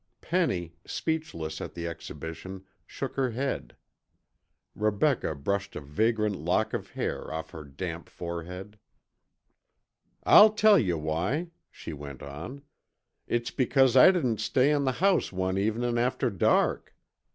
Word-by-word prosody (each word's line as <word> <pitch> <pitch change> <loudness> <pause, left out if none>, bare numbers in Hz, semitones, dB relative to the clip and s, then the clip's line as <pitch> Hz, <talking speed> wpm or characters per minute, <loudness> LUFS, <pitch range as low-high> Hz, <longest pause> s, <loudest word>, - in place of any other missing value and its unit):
Penny, 95 - -1
speechless 120 - -3
at - - -7
the 85 -1 -5
exhibition, 85 +3 -7 0.2
shook - - -5
her 130 -2 +2
head. 135 +4 -3 1.0
Rebecca 105 - +1
brushed 100 +8 -2
a - - -3
vagrant 105 +8 0
lock - - 0
of - - -4
hair - - -4
off 80 0 -5
her 80 - -8
damp 80 +4 -6
forehead. 90 +4 -7 1.4
"I'll 215 +1 +8
tell 215 -2 +6
yuh 90 - 0
why," 90 - -1 0.2
she 80 - -8
went 70 -2 -9
on. 80 - -8 0.6
"It's 120 0 -1
because 130 0 +3
I 130 +8 +9
didn't 130 - +1
stay 130 +6 +3
in 145 -2 +1
the 130 - +1
house 195 -2 +3
one 95 0 -1
evenin' 120 +3 0
after 125 +1 0
dark. 95 - +1
105 Hz, 130 wpm, -28 LUFS, 85-130 Hz, 1.4 s, I